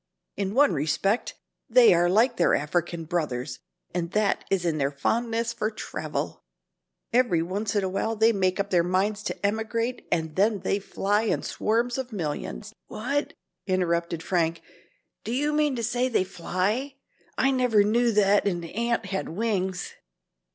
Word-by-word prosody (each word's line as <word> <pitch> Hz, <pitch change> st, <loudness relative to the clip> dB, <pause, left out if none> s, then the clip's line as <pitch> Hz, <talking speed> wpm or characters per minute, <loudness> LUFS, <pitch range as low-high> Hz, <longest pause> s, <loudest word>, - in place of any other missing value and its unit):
"In 200 Hz, +1 st, -2 dB
one 285 Hz, +1 st, +5 dB
respect 180 Hz, -, 0 dB, 0.3 s
they 240 Hz, -3 st, +7 dB
are 175 Hz, +1 st, +3 dB
like 225 Hz, +8 st, +3 dB
their -, -, +4 dB
African 165 Hz, +2 st, -2 dB
brothers 145 Hz, -6 st, -2 dB, 0.3 s
and 170 Hz, -1 st, -2 dB
that 210 Hz, -1 st, +1 dB
is 190 Hz, -2 st, 0 dB
in 160 Hz, -2 st, 0 dB
their 140 Hz, 0 st, +2 dB
fondness 230 Hz, +10 st, -1 dB
for 215 Hz, -2 st, -1 dB
travel. 215 Hz, -, -5 dB, 0.7 s
Every 235 Hz, -10 st, +3 dB
once 200 Hz, +4 st, -3 dB
in 205 Hz, -, +2 dB
a -, -, 0 dB
while 220 Hz, +4 st, -1 dB
they 220 Hz, +1 st, +4 dB
make 185 Hz, -1 st, +1 dB
up 200 Hz, 0 st, -1 dB
their 175 Hz, -2 st, +4 dB
minds 195 Hz, +4 st, 0 dB
to -, -, -3 dB
emigrate 225 Hz, +3 st, -1 dB
and 160 Hz, -2 st, -1 dB
then 205 Hz, 0 st, +2 dB
they 195 Hz, +1 st, 0 dB
fly 205 Hz, +1 st, 0 dB
in -, -, 0 dB
swarms 235 Hz, +4 st, 0 dB
of 255 Hz, -1 st, -5 dB
millions 150 Hz, -, -4 dB
" -, -, -57 dB
"What?" 280 Hz, +6 st, -2 dB, 0.3 s
interrupted 170 Hz, -3 st, 0 dB
Frank, 165 Hz, -2 st, 0 dB, 0.6 s
"do 225 Hz, -, -4 dB
you 295 Hz, +5 st, 0 dB
mean 300 Hz, -2 st, +2 dB
to 235 Hz, -, -3 dB
say 245 Hz, +3 st, 0 dB
they 230 Hz, -, +2 dB
fly? 195 Hz, +9 st, -2 dB, 0.4 s
I 270 Hz, -, +3 dB
never 250 Hz, -5 st, +3 dB
knew 235 Hz, +3 st, +2 dB
that 205 Hz, -1 st, +3 dB
an 175 Hz, -3 st, -1 dB
ant 235 Hz, +7 st, -1 dB
had 190 Hz, -, -3 dB
wings." 190 Hz, -1 st, -2 dB
200 Hz, 165 wpm, -26 LUFS, 175-230 Hz, 0.7 s, they